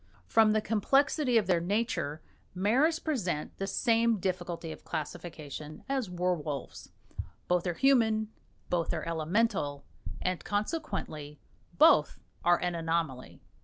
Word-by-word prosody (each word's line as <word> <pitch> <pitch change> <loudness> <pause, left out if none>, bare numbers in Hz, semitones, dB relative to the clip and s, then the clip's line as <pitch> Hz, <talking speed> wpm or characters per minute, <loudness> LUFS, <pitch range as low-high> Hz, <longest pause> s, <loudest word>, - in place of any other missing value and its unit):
From 220 -1 +4
the 215 - +2
complexity 265 +5 +2
of 220 - +3
their 180 -3 +2
nature, 180 -6 -1 0.3
maras 255 - +3
present 185 - -2
the 195 - -2
same 230 +2 +2
difficulty 175 -3 -3
of - - -10
classification 155 -1 -6
as 265 -7 -1
werwolves 175 -6 -3 0.6
both 180 0 +1
are 175 - -1
human, 220 -3 +3 0.4
both 170 -1 0
are 160 - -3
Elemental, 165 -3 0 0.3
and 185 -1 -2
consequently 205 - -3 0.4
both - - +5 0.3
are 175 0 +5
an 175 0 0
anomaly. 165 -6 -2
180 Hz, 120 wpm, -30 LUFS, 165-225 Hz, 0.6 s, both